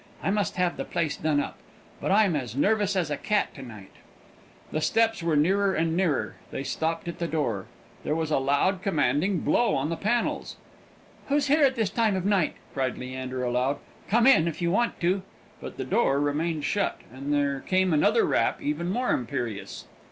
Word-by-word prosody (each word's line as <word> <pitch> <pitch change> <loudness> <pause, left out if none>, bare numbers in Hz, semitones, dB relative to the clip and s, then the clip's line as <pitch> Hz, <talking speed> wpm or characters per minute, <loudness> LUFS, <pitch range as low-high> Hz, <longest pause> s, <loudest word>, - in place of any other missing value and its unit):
"I - - +1
must 205 -3 0
have 180 -1 0
the - - -2
place 165 -4 -2
done 155 -2 +1
up. - - -4 0.4
But - - -3
I'm 200 -4 +4
as 125 -5 -3
nervous 205 +5 +2
as 170 -5 0
a 145 - -1
cat 210 -1 0
to 135 - -10
night." 110 -7 -11 0.8
The 155 - -1
steps 225 +6 +2
were 165 -2 +1
nearer 190 +6 +2
and 165 0 0
nearer 170 -6 0
they - - -4
stopped 165 +4 -2
at 170 - -5
the 170 - -1
door 130 - -2 0.4
there 150 - -1
was 160 -1 -2
a 150 - +3
loud 145 +8 +1
commanding 180 0 +1
blow 240 - +2
on 135 +3 -1
the 165 - -1
panels. 215 +8 -1 0.7
"Who's 285 0 +1
here 300 +2 +4
at 265 -1 +4
this 220 -5 0
time 220 -2 +2
of 185 -1 -2
night?" 195 -5 +2 0.2
cried 130 -2 -1
Leander, 130 0 -5
aloud. 125 +3 0 0.3
"Come 230 +3 +4
in, 260 -11 +6
if 160 -2 -4
you 170 -1 0
want 235 +5 0
to!" 185 +3 +1 0.4
But - - -8
the - - -3
door 140 -12 +2
remained 150 +2 -1
shut, 200 -1 0 0.2
and 135 +3 -5
there 140 -1 +1
came 185 +3 +1
another 205 +9 +3
rap, - - +1
even 150 +4 -2
more 245 +6 0
imperious. 120 -3 -3
165 Hz, 195 wpm, -26 LUFS, 145-200 Hz, 0.8 s, in